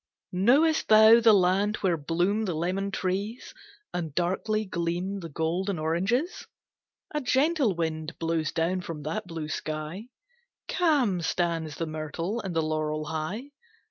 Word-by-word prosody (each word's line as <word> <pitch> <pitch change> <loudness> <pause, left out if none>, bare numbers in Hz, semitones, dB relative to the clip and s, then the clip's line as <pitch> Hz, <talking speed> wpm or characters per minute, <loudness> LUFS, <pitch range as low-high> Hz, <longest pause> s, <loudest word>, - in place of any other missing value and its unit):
MIGNON 185 +2 -1
Knowest 310 +6 +4
thou 220 +1 +8
the 225 -1 +6
land 200 +2 +3
where 185 -4 +2
bloom 175 +8 0
the 180 -5 -2
lemon 185 +5 -1
trees, 200 +4 -3 0.4
And 160 -5 -4
darkly 215 +5 0
gleam 180 +2 -2
the 165 -3 -7
golden 170 +5 -1
oranges? 190 - -1 0.7
A 300 - -1
gentle 265 - +2
wind 160 -1 -3
blows 165 -2 -1
down 170 +3 0
from 160 -4 -7
that 165 +7 -3
blue 165 -3 -5
sky; 155 +7 -5 0.6
Calm 275 - +2
stands 165 -3 -1
the 165 - -2
myrtle 160 +7 -4
and 185 -4 -5
the 160 - +2
laurel 155 -1 -1
high. 160 - -4
180 Hz, 140 wpm, -27 LUFS, 160-215 Hz, 0.7 s, thou